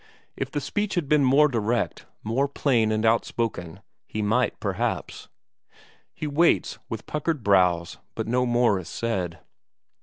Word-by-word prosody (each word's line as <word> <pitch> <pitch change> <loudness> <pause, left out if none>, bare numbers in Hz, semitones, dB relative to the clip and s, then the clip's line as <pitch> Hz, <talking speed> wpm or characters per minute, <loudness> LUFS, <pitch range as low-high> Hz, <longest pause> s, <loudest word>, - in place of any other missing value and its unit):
If - - -3
the - - -2
speech 205 +10 -2
had 170 -5 -1
been 150 0 +4
more 140 +3 +5
direct, 120 -2 -1 0.2
more 125 +6 +1
plain 120 -6 +1
and 110 +1 0
outspoken, 110 -5 -1 0.3
he 110 - -3
might 110 +5 +1
perhaps... - - -3 0.8
He - - -6
waits, 150 +4 +2
with 115 -2 -5
puckered 150 -3 -2
brows, 90 -4 +2 0.2
but - - -3
no 125 +2 +1
more 120 -4 +3
is 85 - -9
said. 95 -8 -2
115 Hz, 145 wpm, -25 LUFS, 105-140 Hz, 0.8 s, more